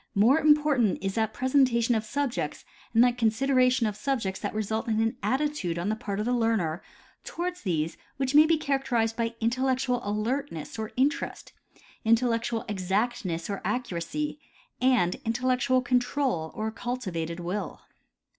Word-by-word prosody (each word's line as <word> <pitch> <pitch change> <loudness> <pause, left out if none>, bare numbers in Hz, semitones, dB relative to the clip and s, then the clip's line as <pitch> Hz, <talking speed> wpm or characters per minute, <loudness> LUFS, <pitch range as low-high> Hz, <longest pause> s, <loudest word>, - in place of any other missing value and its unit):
More 235 +10 +5
important 295 -8 +3
is 195 0 -1
that 220 0 0
presentation 255 -3 +2
of 220 -2 0
subjects 275 +2 -3 0.3
and 230 +1 +5
that 245 0 +2
consideration 255 +2 +3
of 210 -2 -1
subjects 215 -6 -2
that 205 0 -4
result 220 +1 -2
in 220 -1 +1
an 225 +2 +1
attitude 265 - -1
on 175 +4 -1
the 215 - +1
part 200 -2 -4
of 210 - -1
the 245 - +1
learner 220 -9 0 0.4
toward 355 +1 -4
these 165 - -2 0.2
which 270 0 -1
may 305 +2 +7
be 325 0 +3
characterized 265 -6 0
by 230 0 -2
intellectual 255 +1 0
alertness 215 - -3
or 220 -1 -4
interest, 290 +5 -1 0.5
intellectual 230 0 +1
exactness 190 -2 -1
or 200 -1 -4
accuracy, 250 - -3 0.4
and 250 -9 +3
intellectual 255 +2 +1
control 245 - 0
or 215 +1 -2
a - - -7
cultivated 185 -9 -4
will. 180 +1 -4
230 Hz, 145 wpm, -27 LUFS, 210-260 Hz, 0.5 s, may